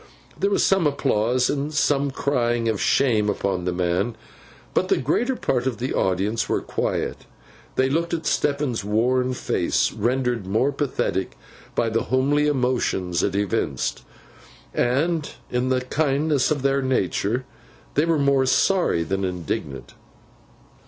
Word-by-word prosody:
There 200 - 0
was 205 - +2
some 190 -5 +3
applause, 125 -3 +1
and 145 +1 -2
some 145 -2 +1
crying 120 -4 0
of 110 -3 0
Shame 110 -6 +2
upon 95 -3 -1
the 90 - 0
man; 90 +5 0 0.6
but - - +1
the - - +2
greater 240 - 0
part 125 - -1
of 125 -4 -2
the 125 +2 -3
audience 100 +4 0
were - - +1
quiet. - - -3 0.5
They 130 - +3
looked 165 +5 0
at 165 -2 -2
Stephen's 140 -6 0
worn 125 +5 +1
face, - - 0
rendered 120 -2 -1
more 110 +8 +2
pathetic 130 - -2 0.4
by 115 - +1
the 115 +1 -1
homely 140 +4 +2
emotions 125 - 0
it 100 - 0
evinced; 100 -2 -1 0.7
and, 150 +6 +1 0.2
in 125 +1 0
the 130 -1 +1
kindness 145 +1 +1
of 145 -4 -1
their 140 0 +2
nature, 125 -1 0 0.5
they - - +2
were 165 -1 +2
more 140 -2 +3
sorry 175 - +2
than 95 +3 -2
indignant. 85 -6 -4
130 Hz, 140 wpm, -23 LUFS, 105-140 Hz, 0.7 s, some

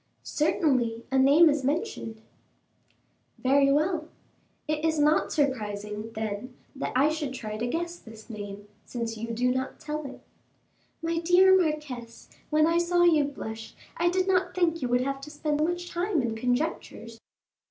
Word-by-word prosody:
"Certainly, 260 -8 +1
a 265 - +3
name 285 +6 +7
is 295 -2 +2
mentioned." 270 - -3 1.1
"Very 275 +1 +3
well; 310 +2 +1 0.6
it 305 0 -1
is 320 -1 +1
not 300 +1 +3
surprising, 210 -6 -2
then, 220 +3 -4 0.2
that 275 - -3
I 275 +4 +4
should 300 -4 -3
try 215 -4 -5
to 230 +3 -2
guess 340 +5 -3
this 220 -1 -13
name, 205 -2 -8 0.2
since 230 -2 -4
you 225 +1 -5
do 245 +2 +1
not 260 +1 -3
tell 300 0 -4
it." 265 - -11 0.8
"My 330 0 0
dear 360 +3 +6
marquise, 300 -9 -2 0.2
when 310 0 +4
I 335 +1 +3
saw 350 0 +2
you 315 -4 +5
blush, 225 -5 -7 0.2
I 345 +1 +2
did 370 +1 0
not 365 -1 +1
think 335 -3 +1
you 250 - 0
would 245 +1 +3
have 275 +1 -2
to 290 - -8
spend 300 0 -1
much 350 +1 -2
time 345 -4 0
in 230 -2 -1
conjectures." 245 -2 -2
285 Hz, 160 wpm, -27 LUFS, 235-330 Hz, 1.1 s, name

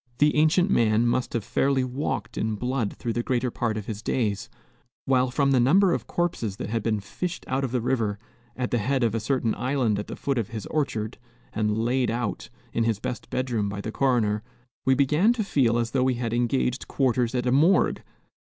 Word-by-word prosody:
The 150 +2 +3
ancient 165 +5 +3
man 110 - +3
must 120 +1 0
have 115 - -1
fairly 135 +4 +1
walked 125 -4 -3
in 110 -1 -1
blood 125 0 -1
through 115 - -3
the 120 - 0
greater 125 0 -1
part 115 -2 -1
of 105 - -5
his 105 -1 -5
days; 110 -5 -1 0.6
while 130 -1 +3
from 140 +2 +1
the 130 - +4
number 175 +9 +4
of - - -3
corpses 140 - -1
that 105 - -5
had 115 -1 0
been 110 0 0
fished 170 - -5
out 130 +1 -1
of 130 - -2
the 125 -1 0
river, 115 -4 0 0.4
at 125 -1 -3
the 120 - +2
head 130 +4 0
of 115 -3 +2
a 115 - 0
certain 115 -1 0
island 125 -5 0
at 105 - -5
the - - -6
foot 140 -3 -1
of 110 - -2
his 110 -4 -6
orchard, 110 -9 -2 0.3
and 105 -1 0
"laid 120 +2 +1
out" 115 -2 -3 0.2
in 115 - +1
his 115 -2 +1
best 120 - -5
bedroom 120 -5 -1
by 100 0 -5
the 110 +2 -4
coroner, 110 -5 +1 0.5
we 130 - +5
began 150 - +3
to 235 -3 -1
feel 125 - +2
as 115 -1 -1
though 130 - +1
we 130 -1 +2
had 120 -1 -3
engaged 120 +2 0
quarters 125 -2 +1
at 125 0 0
a 125 - +2
morgue. 155 +9 +3
120 Hz, 215 wpm, -25 LUFS, 110-135 Hz, 0.6 s, we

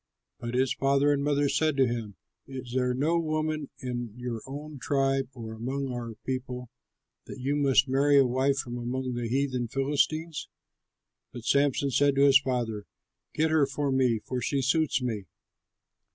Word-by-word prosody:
But 120 +1 -4
his 130 0 +2
father 140 +1 +3
and 140 -1 -1
mother 145 0 +2
said 150 +1 +1
to 135 - +5
him, 115 -4 -3 0.3
"Is 130 -2 -7
there 125 -1 +1
no 160 +6 +2
woman 155 -2 -2
in 120 -4 -4
your 120 -2 -4
own 145 +1 -7
tribe 135 -1 +1
or 110 -2 -7
among 130 +5 -3
all - - -4
our 120 -2 -5
people, 125 -2 -4 0.6
that - - -8
you 135 +3 0
must 140 -1 +4
marry 140 +2 +4
a 135 - +6
wife 130 +2 +1
from 120 -2 -4
among 125 +1 -3
the 120 -1 -2
heathen 130 -1 0
Philistines?" 150 +5 -1 0.8
But 120 -2 -9
Samson 140 0 +2
said 140 +2 +3
to 140 +1 +5
his 135 -1 +7
father, 120 -6 -2 0.5
"Get 160 +1 +2
her 155 -3 +4
for 140 0 -1
me, 130 -3 +3
for 125 -1 -3
she 135 +3 0
suits 145 -1 +1
me." 110 -6 -3
135 Hz, 170 wpm, -28 LUFS, 125-140 Hz, 0.8 s, his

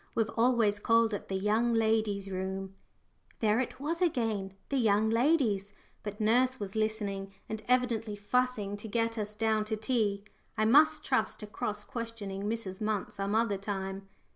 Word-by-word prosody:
We've 225 -2 +1
always 230 -3 +3
called 230 +1 +3
it 205 - -4
the 190 - -3
young 220 +4 +2
ladies' 220 -3 +1
room." 190 0 -4 0.7
There 215 0 +3
it 255 - -3
was 325 +5 -2
again 225 - 0
the 275 - +1
young 220 -1 +3
ladies; 225 -6 +2 0.3
but 205 0 -6
nurse 250 +4 +3
was 200 -1 -5
listening 205 -3 -1 0.2
and 220 0 -4
evidently 235 -4 +1
fussing 210 -1 0
to 210 - -8
get 230 +1 0
us 210 0 -4
down 220 -1 +1
to 215 0 -2
tea. 215 -3 0 0.3
I 215 - +2
must 305 +6 +5
trust 225 -5 0
to - - -5
cross 210 0 -4
questioning 215 -5 -5
Mrs. 210 -3 -3
Munt 210 -1 -1
some 200 0 -2
other 220 -3 +1
time. 195 -1 -4
215 Hz, 165 wpm, -31 LUFS, 205-230 Hz, 0.7 s, must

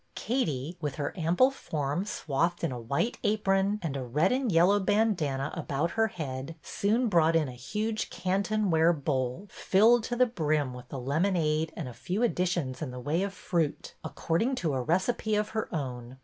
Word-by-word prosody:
Katie, 170 - -2
with 145 -3 -2
her 145 -1 -3
ample 180 +10 +3
form 155 - -3
swathed 170 -2 -1
in 165 - 0
a 125 - -5
white 140 - -1
apron 205 -1 +2
and 150 -4 -2
a 135 - -2
red 150 +9 +1
and 255 -3 +1
yellow 180 +5 +5
bandanna 185 -10 +1
about 160 -1 -2
her 225 0 +2
head, 140 -4 -5
soon 225 +5 +1
brought 165 -5 +3
in 160 -3 +3
a - - -6
huge 210 - -3
Canton 200 +2 0
ware 165 +1 +4
bowl, 135 +2 -2
filled 225 +4 +4
to 240 - -2
the 250 +1 +5
brim 155 - 0
with 125 0 -11
the 140 - -5
lemonade 155 +3 0
and 160 - -4
a 125 - -7
few 190 - -2
additions 175 - 0
in 155 - -3
the 125 0 -7
way 150 +7 0
of 200 0 -1
fruit, 170 -5 -2
according 225 +11 -1
to 165 - -1
a 130 - 0
recipe 190 - 0
of 210 0 0
her 220 -1 -3
own. 130 -5 -5
170 Hz, 185 wpm, -29 LUFS, 140-205 Hz, -, yellow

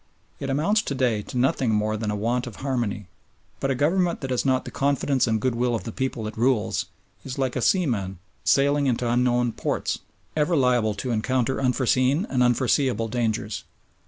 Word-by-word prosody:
It 140 - -4
amounts 165 +11 +2
to 140 - -4
day 120 -5 +1
to 125 - -7
nothing 130 -1 +2
more 110 0 +1
than 110 0 -3
a 105 - -1
want 120 +4 -1
of 120 - -8
harmony, 115 -7 -1 0.5
but 135 - -1
a 135 - +1
Government 170 +6 +1
that 135 -2 -4
has 125 - +1
not 130 -1 +1
the - - -7
confidence 140 -1 +1
and 110 -1 +1
goodwill 120 0 0
of 110 - -4
the 115 - -5
people 130 -2 -3
it 110 - -5
rules 110 -6 +1 0.4
is 130 0 -6
like 130 -2 -1
a 125 - -1
seaman 115 - +1 0.3
sailing 140 +1 +3
into 125 -1 0
unknown 120 0 +2
ports, - - -2 0.4
ever 155 +3 +2
liable 125 -6 +2
to 120 +5 -3
encounter 130 +3 0
unforeseen 130 - +2
and 130 -2 +1
unforeseeable 125 -2 +2
dangers. 110 -3 -2
125 Hz, 185 wpm, -24 LUFS, 115-135 Hz, 0.5 s, sailing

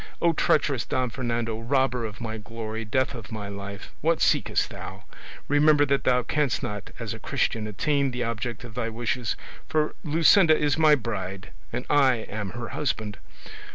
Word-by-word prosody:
O, 170 -1 +3
treacherous 140 -4 +2
Don 130 -2 -1
Fernando! 115 -2 -2
robber 125 0 +1
of 105 -1 -7
my 110 -2 -4
glory, 110 0 -5
death 130 +5 0
of 115 -6 -9
my 105 -2 -5
life! 100 0 -7
What 165 +1 +2
seekest - - +2
thou? - - -8 0.4
Remember 145 0 +5
that 140 0 +1
thou 125 -1 +3
canst 145 -3 0
not 105 -1 -4
as - - -4
a - - -8
Christian 110 -1 -1
attain 140 +7 +1
the 125 -1 -3
object 115 0 -3
of 120 -3 -9
thy 115 0 -2
wishes, 120 +1 -2 0.3
for 155 -1 +1
Luscinda 160 +1 +5
is 145 -2 +2
my 155 -2 +6
bride, 95 -6 -5 0.2
and 120 +2 -3
I 135 -3 +5
am 110 -3 -5
her 120 -1 -5
husband! 110 -8 -2
120 Hz, 170 wpm, -26 LUFS, 110-145 Hz, 0.4 s, my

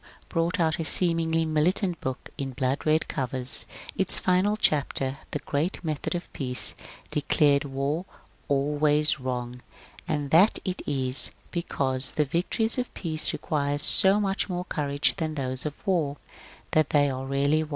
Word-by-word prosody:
brought 170 +2 0
out 160 -1 +1
a - - -1
seemingly 165 -1 +1
militant 170 +3 +1
book 130 -1 -5
in 135 -1 -4
blood 130 +3 -2
red 155 +1 +2
covers, 130 -2 -1 0.3
its 190 -1 +1
final 190 +3 +2
chapter, 140 -6 0
" - - -27
The - - -2
Great 150 +6 -2
Method 155 +2 -3
of 175 - -6
Peace," 125 -3 +3 0.4
declared 145 0 +2
War 140 +5 -2 0.2
" - - -32
always 150 +1 +2
wrong," 125 -1 -4 0.5
and 145 -2 -2
that 185 +7 +5
it 185 -1 -3
is 130 -1 +1 0.2
because 135 -6 0
^^ - - -21
the 150 - +2
victories 185 - -1
of 250 - -3
Peace 160 -3 +1
require 145 -1 -1
so 190 +7 +6
much 195 0 -1
more 180 0 -3
courage 145 -4 0
than 155 -2 -3
those 130 0 -2
of 145 - -6
War, 160 -7 0 0.5
that 155 -2 +2
they 145 -1 +3
are 135 -1 -4
rarely 140 +3 +1
won." 155 - -5
150 Hz, 160 wpm, -26 LUFS, 140-170 Hz, 0.5 s, so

